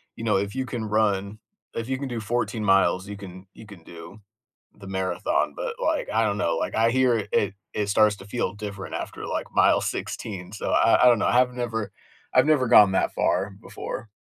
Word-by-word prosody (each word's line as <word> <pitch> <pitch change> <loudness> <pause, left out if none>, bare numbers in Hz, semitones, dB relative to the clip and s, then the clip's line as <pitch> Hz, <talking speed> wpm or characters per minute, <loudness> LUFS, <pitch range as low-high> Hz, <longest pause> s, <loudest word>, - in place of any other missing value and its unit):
you 115 - -8
know, 105 -3 +2
"If 100 +1 -2
you 130 - -2
can 120 -4 -4
run 105 -1 0 0.3
if 115 +1 -4
you 130 - -1
can 140 - -4
do 120 -2 -4
14 115 0 -2
miles, 95 -1 +3
you 105 - -6
can 95 -1 -11
you 110 - -13
can 100 -5 -13
do 85 +5 -12 0.6
the 100 -2 -12
marathon," 95 - -1
but - - -4
like, 320 -11 -1
I 115 - +2
don't 105 -1 -1
know, 85 -4 0
like - - -2
I 115 +1 +3
hear 120 -5 +2
it 100 -1 +1 0.2
it 105 -1 -1
starts 105 +1 +4
to 95 - -12
feel 105 -3 -2
different 100 -2 -6
after, - - -6
like, - - -3
mile - - +4
16, 95 -5 -5
so 105 - -3
I - - +4
I - - +7
don't 120 -3 +5
know, - - +1
I've 125 +1 +3
never 110 -4 -3 0.4
I've 130 - +5
never 145 -5 +3
gone 105 -5 +7
that - - +1
far 95 +2 0
before. 115 - -7
105 Hz, 210 wpm, -25 LUFS, 100-120 Hz, 0.6 s, I